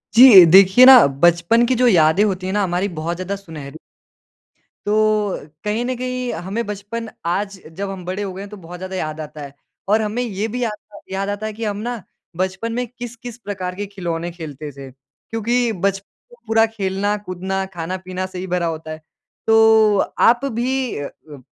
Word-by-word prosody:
जी। 225 -8 +10
देखिए 195 +6 +8
ना, 260 - +10
बचपन 170 - +3
की 255 - +2
जो 250 - +5
यादें 175 -2 +4
होती 190 -3 -1
हैं 190 - -2
ना 205 -1 +1
हमारी, 180 +2 -1
बहुत 170 -1 -4
ज़्यादा 185 +2 -4
सुनहरी 160 -6 -10 1.1
तो 210 -1 +1 0.3
कहीं 210 +3 -1
न 255 +1 -2
कहीं 250 0 -3
हमें 195 +8 -4
बचपन, 210 +3 -6 0.2
आज 195 +3 -2
जब 195 +4 -5
हम 190 -2 -7
बड़े 185 +3 -3
हो 195 -2 -5
गए 190 - -7
हैं, 200 - -8
तो 210 - -10
बहुत 180 -1 -10
ज़्यादा 185 +1 -6
याद 155 -3 -4
आता 150 0 -9
है। 140 -1 -9 0.4
और 215 +2 +3
हमें 215 +3 -2
ये 210 -2 -3
भी 245 +3 -3
याद 230 - 0 0.2
आ - - -10
याद 195 +1 -2
आता 205 +1 -4
है 215 - -4
कि 225 +2 -7
हम 205 -1 -2
ना 235 +1 -4 0.4
बचपन 190 +5 -2
में 245 +1 -2
किस-किस 240 0 -9
प्रकार 190 -5 -5
के 205 +2 -4
खिलौने 175 -4 -4
खेलते 155 -3 -8
थे 135 -1 -10
क्योंकि 225 - -3
बच 195 0 +1 0.5
पूरा 225 0 +4
खेलना 205 -2 -2
कूदना, 190 0 -4
खाना-पीना 185 +1 -5
से 185 -1 -8
ही 185 - -5
भरा 180 -1 -1
होता 160 -1 -5
है। 155 0 -8 0.5
तो 220 -1 +5 0.3
आप 240 +3 +2
भी 255 +1 -2
अ, 145 - -4
अ, 145 -2 -15
195 Hz, 190 wpm, -20 LUFS, 175-225 Hz, 1.1 s, जी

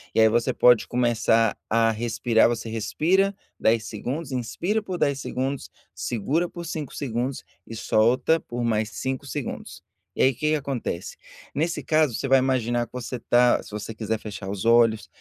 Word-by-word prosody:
E - - +3
aí 110 - +7
você 115 +1 +1
pode 120 -3 +5
começar 115 -2 +2
a 115 0 +3
respirar, 115 0 +2
você 115 -1 -3
respira 170 - +1 0.2
10 110 0 +2
segundos, 135 +7 -5
inspira 165 - -1
por 185 -3 -5
10 140 -4 +1
segundos, 135 +1 -3 0.2
segura 140 - -1
por 170 0 -8
5 155 -3 -5
segundos 125 0 -3 0.2
e 115 - -7
solta 120 +9 +2
por 120 -4 -5
mais 110 -2 0
5 130 +3 -4
segundos. 140 -2 -6 0.3
E - - +2
aí 130 - +4
que 150 +5 -1
que 155 - +3
acontece, 130 - -4 0.4
nesse 165 +4 -1
caso 155 -5 +2
você 135 - -2
vai 135 0 +5
imaginar 120 -2 0
que - - -37
você 125 0 -5
tá 120 +1 +3
se - - -12
você 105 +2 -5
quiser 110 0 -2
fechar 100 -2 -7
os 100 0 -4
olhos, 115 -2 +4
120 Hz, 175 wpm, -25 LUFS, 115-140 Hz, 0.4 s, aí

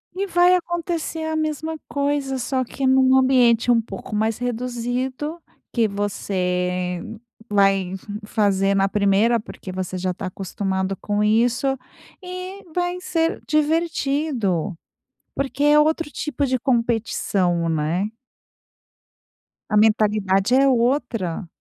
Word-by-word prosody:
E 390 +2 -1
vai 355 -1 +4
acontecer 340 -2 -3
a 315 0 -2
mesma 315 +1 -2
coisa, 280 -2 -1
só 255 +1 -1
que 265 +2 -3
num 260 0 +5
ambiente 250 -3 +4
um 235 -1 +4
pouco 225 0 -7
mais 220 +1 0
reduzido, 250 +5 -3 0.3
que 230 -3 +2
você 180 -3 -2 0.5
vai 195 -2 +2 0.3
fazer 200 -2 +1
na 195 0 +2
primeira, 210 +3 +3
porque 205 -2 -9
você 185 0 -4
já 185 0 -1
está 185 - -6
acostumado 190 0 -3
com 205 +2 -1
isso, 240 +5 +2 0.4
e 365 +2 -7
vai 355 0 -1
ser 330 -2 -1
divertido. 290 - 0 0.6
Porque 275 +1 -2
é 295 +1 +6
outro 315 +1 +1
tipo 295 -1 -2
de 260 -1 0
competição, 225 -8 0
né? 165 +5 0 1.6
A 210 - 0
mentalidade 210 0 +3
é 270 +1 +5
outra. 235 - 0
235 Hz, 115 wpm, -22 LUFS, 195-290 Hz, 1.6 s, é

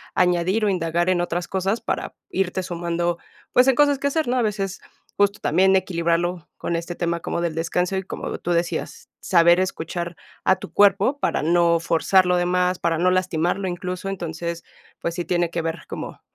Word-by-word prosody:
a - - +3
añadir 180 +4 +2
o - - +3
indagar 175 -1 0
en 185 -1 +2
otras 175 0 -2
cosas 195 +4 -1
para - - -3 0.2
irte 190 - -1
sumando, 175 -1 -2 0.4
pues, 250 +1 +5
en 265 - +5
cosas 285 +1 +4
que 280 - 0
hacer, 310 0 0
¿no? 250 +1 +1
A - - +3
veces, 195 -3 -2 0.4
justo 205 0 +2
también 190 +4 +3
equilibrarlo 170 -1 0
con 170 - -2
este 170 +1 -3
tema 170 -1 -2
como 170 - -3
del 170 -2 -2
descanso 180 +3 -1
y, 190 - -2
como - - -5
tú 175 - -3
decías: 170 0 -2
"Saber 170 -1 +4
escuchar 170 -1 -3 0.3
a 190 - +4
tu - - -10
cuerpo 205 +7 +3
para - - 0
no 170 +1 +3
forzar 180 +3 +3
lo 180 0 +3
demás, 180 +1 +1
para 165 -2 0
no 180 +1 +3
lastimarlo", 185 +1 0
incluso, 180 +1 -4
entonces, 170 -2 -4 0.4
pues 170 - -2
sí, 175 -1 -3
tiene 175 -1 +1
que 170 0 -3
ver 165 +1 -3
como - - -7
175 Hz, 190 wpm, -23 LUFS, 170-190 Hz, 0.4 s, pues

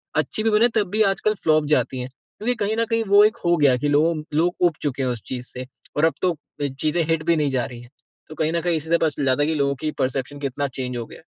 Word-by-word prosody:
अच्छी 215 - 0
भी 225 - +3
बने, 215 +3 +5
तब 210 -4 +1
भी 215 +1 +1
आजकल 215 +2 0
फ्लॉप 155 -1 +3
जाती 130 +1 -1
हैं, 125 - -6 0.3
क्योंकि 245 +4 0
कहीं 215 +2 0
न - - +2
कहीं, 225 0 +2
वो 200 +1 +7
एक 220 +2 +1
हो 175 0 +4
गया 145 -3 +5
है 125 - +2
कि 145 - 0
लोगों 155 +3 +3 0.2
लोग 175 +2 +2
ऊब 170 - -2
चुके 140 -2 -2
हैं 130 - 0
उस 120 -3 -3
चीज़ 125 -1 -5
से 125 0 -7 0.3
और 150 - +4
अब 165 - +2
तो 180 -1 +3
अ, 145 -1 -6
चीज़ें 155 +2 +1
हिट 165 -1 0
भी 170 0 +3
नहीं 150 -2 +1
जा 130 -3 0
रही 120 -1 -9
हैं। 120 - -15 0.4
तो 155 - -9
कहीं 155 0 0
न 170 - 0
कहीं 175 0 0
इसी 155 +1 -5
से 170 - +4
पता 165 - +2
चल 145 -1 -3
जाता 130 +1 +2
है - - +1
कि 160 - 0
लोगों 140 -1 +1
की 155 - -1
परसेप्शन 135 +2 -2
कितना 140 0 -2
चेंज 125 -1 -4
हो 120 - -4
गया - - -13
है। - - -22
155 Hz, 300 wpm, -22 LUFS, 130-170 Hz, 0.4 s, वो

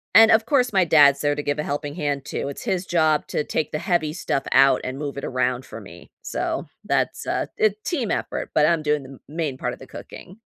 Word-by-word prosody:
and, 225 +1 +9
of 220 0 +4
course, 250 -1 +2
my 190 -3 +3
dad's 145 -3 +5
there 145 0 +2
to 150 - -3
give 145 0 -1
a - - 0
helping 145 0 -4
hand 145 -2 -2
too, - - -4
it's 140 - -7
his 185 0 -1
job 155 -4 +2
to - - -1
take 150 0 -2
the 150 - -2
heavy 170 -3 0
stuff 155 -5 -2
out 135 -1 +5
and 130 +1 -4
move 145 -2 -5
it 140 - -4
around 125 0 -1
for 115 - -9
me. 90 -3 -13
So, - - -3 0.2
that's - - -1
a - - -1
a 215 - +4
team 270 - -2
effort, - - -3
but 150 - +4
I'm 165 -1 +1
doing 150 -1 0
the 130 - -12
m 135 - -12
main 150 -3 -3
part - - -3
of - - -11
the - - -12
cooking. 190 +4 -11
150 Hz, 245 wpm, -23 LUFS, 140-175 Hz, 0.2 s, and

